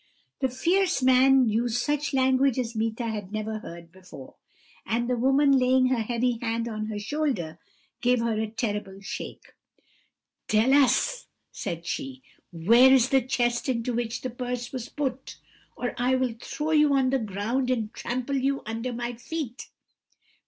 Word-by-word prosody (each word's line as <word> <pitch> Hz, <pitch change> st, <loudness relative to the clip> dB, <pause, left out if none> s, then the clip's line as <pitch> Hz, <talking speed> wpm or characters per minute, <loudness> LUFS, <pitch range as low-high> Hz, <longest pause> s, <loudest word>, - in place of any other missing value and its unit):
"The 265 Hz, -, +1 dB
fierce 350 Hz, +4 st, +1 dB
man 260 Hz, 0 st, +5 dB
used 230 Hz, +2 st, 0 dB
such 295 Hz, +3 st, -1 dB
language 265 Hz, -1 st, +2 dB
as 240 Hz, -2 st, -2 dB
Meeta 225 Hz, +2 st, -2 dB
had 205 Hz, -3 st, -5 dB
never 215 Hz, 0 st, -3 dB
heard 170 Hz, -4 st, -11 dB
before; 180 Hz, -7 st, -13 dB, 0.5 s
and 235 Hz, +2 st, -1 dB
the 250 Hz, -, +1 dB
woman, 270 Hz, +4 st, +3 dB
laying 255 Hz, -1 st, +4 dB
her 250 Hz, -3 st, +1 dB
heavy 235 Hz, +1 st, -1 dB
hand 230 Hz, 0 st, -1 dB
on 215 Hz, -2 st, -4 dB
her 215 Hz, -1 st, -4 dB
shoulder, 205 Hz, -, -2 dB, 0.4 s
gave 250 Hz, -1 st, +3 dB
her 230 Hz, 0 st, 0 dB
a 220 Hz, -, -1 dB
terrible 210 Hz, -3 st, -4 dB
shake. 195 Hz, -, -8 dB, 0.9 s
"'Tell 220 Hz, +5 st, +3 dB
us,' 285 Hz, -, +3 dB, 0.2 s
said 170 Hz, -3 st, -5 dB
she, 270 Hz, +5 st, -5 dB, 0.3 s
'where 230 Hz, +10 st, +5 dB
is 260 Hz, -1 st, +5 dB
the 270 Hz, -1 st, +4 dB
chest 240 Hz, 0 st, 0 dB
into 245 Hz, -1 st, -1 dB
which 235 Hz, -1 st, -2 dB
the 255 Hz, -, -4 dB
purse 245 Hz, 0 st, -4 dB
was 250 Hz, -3 st, -6 dB
put, 270 Hz, -2 st, -4 dB, 0.4 s
or 245 Hz, -, -3 dB
I 250 Hz, +1 st, +2 dB
will 255 Hz, -2 st, 0 dB
throw 310 Hz, +1 st, -3 dB
you 300 Hz, -2 st, +4 dB
on 260 Hz, -1 st, +2 dB
the 270 Hz, -, +2 dB
ground 220 Hz, +5 st, -2 dB
and 225 Hz, -4 st, -1 dB
trample 255 Hz, +3 st, -3 dB
you 275 Hz, +1 st, 0 dB
under 230 Hz, +3 st, -3 dB
my 240 Hz, +1 st, -3 dB
feet.' 245 Hz, +2 st, -6 dB
245 Hz, 160 wpm, -26 LUFS, 225-265 Hz, 0.9 s, man